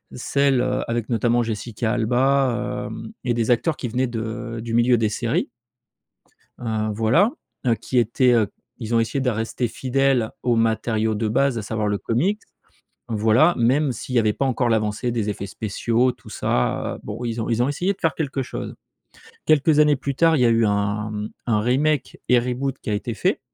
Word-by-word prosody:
celles, 140 Hz, +1 st, +1 dB
heu, 130 Hz, +1 st, 0 dB
avec 115 Hz, -1 st, -2 dB
notamment 120 Hz, +1 st, +2 dB
Jessica 110 Hz, 0 st, -3 dB
Alba, 125 Hz, +2 st, +1 dB
hem, -, -, -8 dB
et 120 Hz, -, +1 dB
des 115 Hz, 0 st, 0 dB
acteurs 150 Hz, +7 st, +2 dB
qui 125 Hz, -, -4 dB
venaient 130 Hz, +3 st, 0 dB
de 115 Hz, 0 st, -5 dB
du 115 Hz, -, -5 dB
milieu 120 Hz, +1 st, +4 dB
des 110 Hz, -2 st, +1 dB
séries 120 Hz, -, -1 dB, 1.1 s
heu, 110 Hz, -2 st, -1 dB
voilà, 115 Hz, -, +3 dB, 0.4 s
heu, 115 Hz, -, +4 dB
qui 125 Hz, -, -2 dB
étaient, 120 Hz, +2 st, +3 dB
heu, 110 Hz, -4 st, +3 dB, 0.3 s
ils 115 Hz, -1 st, -3 dB
ont 115 Hz, -, +4 dB
essayé 115 Hz, +5 st, -1 dB
de 125 Hz, -, +1 dB
rester 115 Hz, +2 st, -2 dB
fidèles 130 Hz, -1 st, +1 dB
aux 120 Hz, -2 st, +2 dB
matériaux 110 Hz, -1 st, +1 dB
de 110 Hz, +1 st, -1 dB
base, 125 Hz, +2 st, +1 dB
à -, -, -4 dB
savoir 110 Hz, 0 st, -2 dB
le 105 Hz, -, 0 dB
comics 180 Hz, -, 0 dB, 0.7 s
voilà, 115 Hz, +9 st, +3 dB
même 130 Hz, +4 st, +2 dB
s'il 125 Hz, +2 st, -5 dB
y -, -, +6 dB
avait 110 Hz, -2 st, +3 dB
pas 135 Hz, -, -2 dB
encore 125 Hz, -1 st, +1 dB
l'avancée 110 Hz, +2 st, 0 dB
des 110 Hz, -3 st, -1 dB
effets 100 Hz, -1 st, -5 dB
spéciaux, 115 Hz, +5 st, 0 dB
tout -, -, -12 dB
ça, 60 Hz, -, -1 dB
heu, -, -, -15 dB
bon, 110 Hz, +4 st, -6 dB
ils 115 Hz, -1 st, -2 dB
ont 110 Hz, -, -3 dB
ils 115 Hz, 0 st, +1 dB
ont 125 Hz, -, +1 dB
essayé 175 Hz, +7 st, 0 dB
de 195 Hz, -, -15 dB
faire 165 Hz, -, 0 dB
quelque 140 Hz, -3 st, -2 dB
chose. -, -, -6 dB, 0.7 s
Quelques 155 Hz, 0 st, +4 dB
années 150 Hz, -1 st, +5 dB
plus 140 Hz, 0 st, -4 dB
tard, 165 Hz, -1 st, +4 dB
il -, -, +1 dB
y -, -, +4 dB
a -, -, +5 dB
eu 115 Hz, -1 st, +3 dB
un 105 Hz, +1 st, -1 dB, 0.3 s
un 110 Hz, -3 st, +2 dB
remake 135 Hz, +6 st, 0 dB
et 125 Hz, -1 st, +5 dB
reboot 125 Hz, +2 st, -2 dB
qui -, -, -4 dB
a -, -, +1 dB
été 110 Hz, +3 st, -3 dB
fait, 185 Hz, -, 0 dB
120 Hz, 200 wpm, -22 LUFS, 110-130 Hz, 1.1 s, y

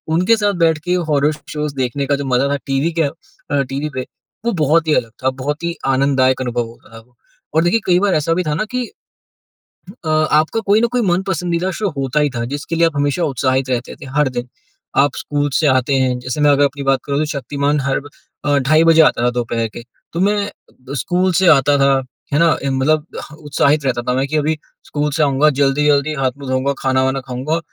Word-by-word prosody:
उनके 185 Hz, +7 st, +4 dB
साथ 205 Hz, -1 st, +1 dB
बैठ 160 Hz, -1 st, +3 dB
के 180 Hz, -, +1 dB, 0.2 s
हॉरर 145 Hz, 0 st, +2 dB, 0.2 s
शोज़ 150 Hz, -1 st, -3 dB
देखने 130 Hz, +1 st, -1 dB
का 145 Hz, -, +1 dB
जो 140 Hz, 0 st, -4 dB
मज़ा 130 Hz, +1 st, +1 dB
था, 140 Hz, -, +1 dB
टीवी 135 Hz, +4 st, 0 dB
के -, -, +4 dB
अ, 145 Hz, -, -2 dB, 0.6 s
टीवी 140 Hz, +3 st, -3 dB
पे, 130 Hz, 0 st, -3 dB, 0.4 s
वो 235 Hz, -, +2 dB
बहुत 160 Hz, +3 st, +3 dB
ही 155 Hz, -, +3 dB
अलग 115 Hz, -, -1 dB
था, 130 Hz, -, +3 dB
बहुत 140 Hz, +4 st, -4 dB
ही 170 Hz, 0 st, -2 dB
आनंददायक 130 Hz, -1 st, +2 dB
अनुभव 120 Hz, -1 st, -1 dB
होता 115 Hz, -1 st, -17 dB
था 115 Hz, -, -9 dB
वो। 125 Hz, -, -33 dB, 0.4 s
और 160 Hz, -, +4 dB
देखिए, 175 Hz, +7 st, +2 dB
कई 180 Hz, -1 st, +3 dB
बार 200 Hz, -1 st, +2 dB
ऐसा 155 Hz, +2 st, +1 dB
भी 180 Hz, +2 st, 0 dB
था 150 Hz, -, 0 dB
ना 215 Hz, -, -1 dB
कि 250 Hz, -1 st, -1 dB, 1.2 s
अ, -, -, -1 dB
आपका 155 Hz, +5 st, +2 dB
कोई 210 Hz, +3 st, +4 dB
ना 235 Hz, -, +3 dB
कोई 250 Hz, -, +1 dB
मन-पसंदीदा 180 Hz, -1 st, -1 dB
शो 205 Hz, -2 st, 0 dB
होता 135 Hz, +2 st, 0 dB
ही 150 Hz, -1 st, +2 dB
था, 120 Hz, 0 st, -2 dB
जिसके 145 Hz, +6 st, -4 dB
लिए 165 Hz, 0 st, +4 dB
आप 165 Hz, -, -5 dB
हमेशा 145 Hz, +4 st, 0 dB
उत्साहित 130 Hz, -2 st, 0 dB
रहते 125 Hz, 0 st, -2 dB
थे, -, -, -8 dB
हर 150 Hz, -3 st, +3 dB
दिन। 125 Hz, 0 st, -4 dB, 0.5 s
आप 140 Hz, -1 st, +3 dB
स्कूल 145 Hz, 0 st, -1 dB
से 155 Hz, -, +2 dB
आते 130 Hz, +1 st, +2 dB
हैं 130 Hz, -1 st, +1 dB
जैसे 125 Hz, +4 st, -4 dB
मैं 150 Hz, -, +5 dB
अगर 145 Hz, 0 st, +4 dB
अपनी 140 Hz, 0 st, -3 dB
बात 135 Hz, -1 st, +2 dB
करूँ, 140 Hz, 0 st, -1 dB
तो 155 Hz, -, +1 dB
शक्तिमान 145 Hz, 0 st, -1 dB
हर 135 Hz, 0 st, 0 dB
ब 145 Hz, -, -12 dB, 0.4 s
अ, 145 Hz, -1 st, +3 dB
ढाई 155 Hz, +5 st, +3 dB
बजे 165 Hz, -1 st, +6 dB
आता 150 Hz, -6 st, +3 dB
था 125 Hz, -, +4 dB
दोपहर 120 Hz, -2 st, -2 dB
के। -, -, -7 dB, 0.3 s
तो 170 Hz, -, -3 dB
मैं 205 Hz, +2 st, +3 dB
अ, -, -, -5 dB, 0.3 s
ब 135 Hz, +2 st, -9 dB
स्कूल 180 Hz, +7 st, +1 dB
से 190 Hz, +2 st, +3 dB
आता 145 Hz, -1 st, +4 dB
था, 140 Hz, 0 st, +4 dB, 0.4 s
है 145 Hz, -, +3 dB
ना? 165 Hz, -1 st, +4 dB
इम 135 Hz, -1 st, -1 dB
मतलब 155 Hz, +3 st, +2 dB, 0.3 s
ह -, -, -11 dB
उत्साहित 150 Hz, -1 st, +1 dB
रहता 125 Hz, -2 st, 0 dB
था -, -, +2 dB
मैं 135 Hz, -, +1 dB
कि 155 Hz, -, -1 dB
अभी 155 Hz, +1 st, +1 dB, 0.3 s
स्कूल 150 Hz, 0 st, -1 dB
से 155 Hz, +2 st, +1 dB
आऊँगा, 145 Hz, +1 st, +3 dB
जल्दी-जल्दी 145 Hz, +1 st, +2 dB
हाथ-मुँह 135 Hz, +1 st, -2 dB
धोऊँगा, 130 Hz, +2 st, +1 dB
खाना-वाना 130 Hz, 0 st, +1 dB
खाऊँगा 130 Hz, +6 st, -2 dB
145 Hz, 225 wpm, -18 LUFS, 130-160 Hz, 1.2 s, बजे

